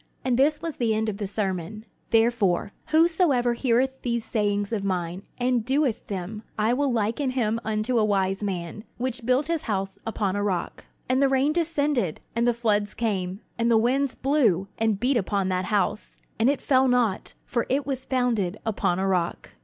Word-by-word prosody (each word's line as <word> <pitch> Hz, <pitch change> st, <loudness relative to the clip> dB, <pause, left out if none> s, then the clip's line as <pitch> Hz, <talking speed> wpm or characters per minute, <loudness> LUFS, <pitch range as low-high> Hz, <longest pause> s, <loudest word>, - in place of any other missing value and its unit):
And 255 Hz, -2 st, +2 dB
this 295 Hz, +5 st, +2 dB
was 330 Hz, -2 st, -4 dB
the 225 Hz, -3 st, +1 dB
end 220 Hz, 0 st, 0 dB
of 200 Hz, -, -4 dB
the 205 Hz, -1 st, -3 dB
Sermon: 200 Hz, +1 st, -3 dB, 0.2 s
"Therefore, 225 Hz, -6 st, +2 dB, 0.2 s
whosoever 315 Hz, -6 st, +3 dB
heareth 260 Hz, +2 st, +1 dB
these 235 Hz, -2 st, -1 dB
sayings 205 Hz, -1 st, 0 dB
of 205 Hz, -3 st, -1 dB
mine, 180 Hz, -2 st, -2 dB, 0.2 s
and 245 Hz, -2 st, +1 dB
doeth 265 Hz, -1 st, 0 dB
them, 200 Hz, +2 st, -5 dB, 0.2 s
I 215 Hz, +2 st, +2 dB
will 280 Hz, +1 st, +1 dB
liken 230 Hz, +4 st, 0 dB
him 230 Hz, -3 st, 0 dB
unto 220 Hz, +3 st, 0 dB
a -, -, +3 dB
wise 195 Hz, -2 st, +1 dB
man, 190 Hz, 0 st, -4 dB
which 250 Hz, -1 st, -3 dB
built 255 Hz, +3 st, +3 dB
his 330 Hz, -1 st, -1 dB
house 195 Hz, -1 st, -2 dB
upon 205 Hz, -3 st, -1 dB
a 205 Hz, -, -1 dB
rock: 190 Hz, -4 st, -2 dB, 0.2 s
"And 260 Hz, +2 st, +2 dB
the 275 Hz, -, +4 dB
rain 270 Hz, +3 st, +2 dB
descended, 295 Hz, -, 0 dB, 0.2 s
and 235 Hz, +1 st, +2 dB
the -, -, +5 dB
floods 210 Hz, -3 st, 0 dB
came, 195 Hz, -3 st, -2 dB, 0.2 s
and 230 Hz, 0 st, +2 dB
the 230 Hz, -, +5 dB
winds 260 Hz, +4 st, +1 dB
blew, 235 Hz, -, +2 dB
and 220 Hz, -3 st, +1 dB
beat 255 Hz, +3 st, +2 dB
upon 195 Hz, -2 st, 0 dB
that 185 Hz, 0 st, 0 dB
house; 210 Hz, +1 st, -1 dB, 0.2 s
and 230 Hz, +4 st, +4 dB
it 285 Hz, -, 0 dB
fell 265 Hz, -1 st, +3 dB
not; 245 Hz, -6 st, +1 dB
for 235 Hz, -1 st, -1 dB
it 275 Hz, +1 st, +1 dB
was 265 Hz, -2 st, -3 dB
founded 235 Hz, -8 st, 0 dB
upon 200 Hz, -5 st, 0 dB
a 190 Hz, -, 0 dB
rock. 180 Hz, -3 st, -1 dB
225 Hz, 185 wpm, -25 LUFS, 200-260 Hz, 0.2 s, the